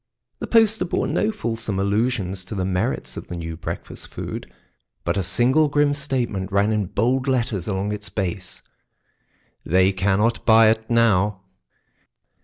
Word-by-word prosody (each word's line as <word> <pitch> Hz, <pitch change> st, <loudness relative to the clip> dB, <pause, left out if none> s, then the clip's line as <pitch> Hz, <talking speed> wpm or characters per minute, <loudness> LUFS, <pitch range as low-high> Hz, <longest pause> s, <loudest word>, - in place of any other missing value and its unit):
The -, -, -4 dB
poster 225 Hz, -3 st, +4 dB
bore 175 Hz, -, -1 dB
no 215 Hz, -, 0 dB
fulsome 115 Hz, -, -3 dB
allusions 100 Hz, -2 st, 0 dB
to 100 Hz, -, -6 dB
the 95 Hz, -2 st, -1 dB
merits 90 Hz, -1 st, -2 dB
of -, -, -7 dB
the 90 Hz, -, -6 dB
new 80 Hz, -1 st, -5 dB
breakfast 80 Hz, -, -6 dB
food, -, -, -7 dB, 0.5 s
but -, -, 0 dB
a 100 Hz, -, +1 dB
single 130 Hz, -, +3 dB
grim 145 Hz, 0 st, +2 dB
statement 125 Hz, -9 st, -2 dB
ran 100 Hz, +2 st, +2 dB
in 105 Hz, -3 st, 0 dB
bold 125 Hz, +7 st, 0 dB
letters 115 Hz, -8 st, 0 dB
along 100 Hz, 0 st, -1 dB
its 105 Hz, -1 st, -5 dB
base: 90 Hz, -, -4 dB, 1.0 s
"They 95 Hz, +3 st, +3 dB
cannot 100 Hz, +5 st, +1 dB
buy 110 Hz, -1 st, +6 dB
it 110 Hz, 0 st, -3 dB
now." 105 Hz, -5 st, +2 dB
105 Hz, 150 wpm, -22 LUFS, 95-125 Hz, 1.0 s, buy